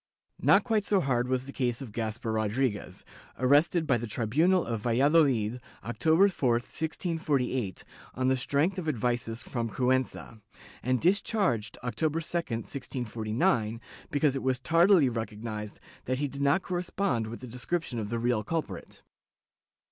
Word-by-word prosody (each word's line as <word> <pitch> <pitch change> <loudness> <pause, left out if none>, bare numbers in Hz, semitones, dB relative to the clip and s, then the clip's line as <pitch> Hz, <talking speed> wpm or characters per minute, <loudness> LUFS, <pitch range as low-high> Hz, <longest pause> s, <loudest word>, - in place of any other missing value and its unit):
Not - - +5
quite 220 -4 +1
so 200 -1 +2
hard 125 -6 0
was 130 0 0
the 140 - -7
case 120 -4 -1
of 130 -5 -7
Gaspar 110 +1 -3
Rodriguez, 110 +1 -1 0.3
arrested 145 +6 +3
by 130 -5 +2
the 120 - -4
tribunal 155 - +2
of 115 -2 -2
Valladolid, 125 -2 +3 0.2
October 160 - +3
4, 135 -11 +1
1648, 140 - -2 0.3
on 130 0 0
the 130 - +4
strength 145 +8 +1
of 160 -3 -2
advices 120 -3 -1
from 115 -2 -3
Cuenca, 130 -3 -1 0.4
and 130 +1 +1
dis 190 +4 +3
charged 125 - 0
October 150 +7 -1
2, 165 - -4
1649, 115 - -1 0.3
because 145 -1 +2
it 135 - -2
was 130 -1 0
tardily 165 +1 +5
recognized 110 -2 -5 0.3
that 130 +1 -1
he 145 +2 -1
did 140 +1 -7
not 140 +7 +3
correspond 175 - -1
with 115 +2 -7
the - - -7
description 125 +2 -3
of 105 -2 -4
the 115 - -1
real 115 -2 0
culprit. 130 - -5
130 Hz, 150 wpm, -29 LUFS, 115-160 Hz, 0.4 s, Not